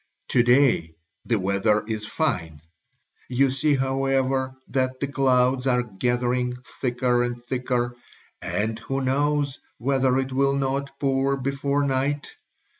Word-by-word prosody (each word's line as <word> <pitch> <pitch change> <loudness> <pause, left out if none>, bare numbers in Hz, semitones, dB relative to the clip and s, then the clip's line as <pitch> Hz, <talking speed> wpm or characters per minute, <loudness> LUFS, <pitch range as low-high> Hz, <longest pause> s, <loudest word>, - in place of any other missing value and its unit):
To 125 - +4
day 120 - +3 0.3
the 115 - +1
weather 100 +2 +1
is 110 -1 -3
fine; 85 - -2 0.7
you 130 +1 +3
see, 145 +2 +2
however, 135 0 0
that 130 -1 -1
the - - 0
clouds 130 -1 +2
are 125 -1 +3
gathering 125 +3 -1 0.3
thicker 125 -1 +1
and 120 0 -2
thicker 125 -1 -1 0.5
and 110 +2 -2
who 135 +4 -3
knows 140 +1 0 0.2
whether 130 0 +2
it 135 0 -1
will 140 +1 +2
not 140 0 -1
pour 135 0 +1
before 140 +2 -1
night? 140 +1 -1
130 Hz, 125 wpm, -24 LUFS, 120-135 Hz, 0.7 s, To